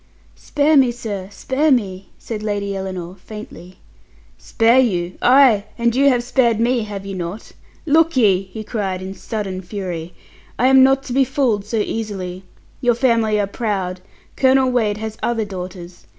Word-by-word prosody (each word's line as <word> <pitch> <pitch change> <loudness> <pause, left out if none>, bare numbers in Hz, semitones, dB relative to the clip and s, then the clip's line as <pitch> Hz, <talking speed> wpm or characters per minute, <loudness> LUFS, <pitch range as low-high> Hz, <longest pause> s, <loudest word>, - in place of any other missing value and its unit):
"Spare 295 +1 +1
me, 260 -3 +5
sir, 205 -5 -6
spare 265 +8 -1
me!" 195 -7 0
said 220 -2 -6
Lady 205 -2 -2
Ellinor 185 -2 -5
faintly. 185 -4 -10 0.6
"Spare 230 +2 +2
you! 180 -8 0
Ay, 245 -5 +5
you 235 +4 +3
have 245 -2 +1
spared 240 -3 +2
me, 240 +1 +2
have 200 -2 -7
you 195 - -5
not? 180 +3 -6 0.3
Look 320 0 +3
ye," 200 -6 +4
he 215 +4 -8
cried, 195 -4 -3
in 190 +1 -6
sudden 195 -2 -5
fury, 180 -3 -6 0.4
"I 255 +2 +3
am 265 0 +7
not 270 +1 +4
to 255 - -6
be 270 +1 +4
fooled 255 -7 0
so 225 +2 -3
easily. 200 -4 -3 0.4
Your 245 -2 +3
family 230 -4 +2
are 205 - +1
proud. 195 -4 -3 0.3
Colonel 260 -1 +3
Wade 215 -4 +1
has 220 +1 -6
other 230 -2 -1
daughters. 180 -2 -9
215 Hz, 160 wpm, -19 LUFS, 190-250 Hz, 0.6 s, am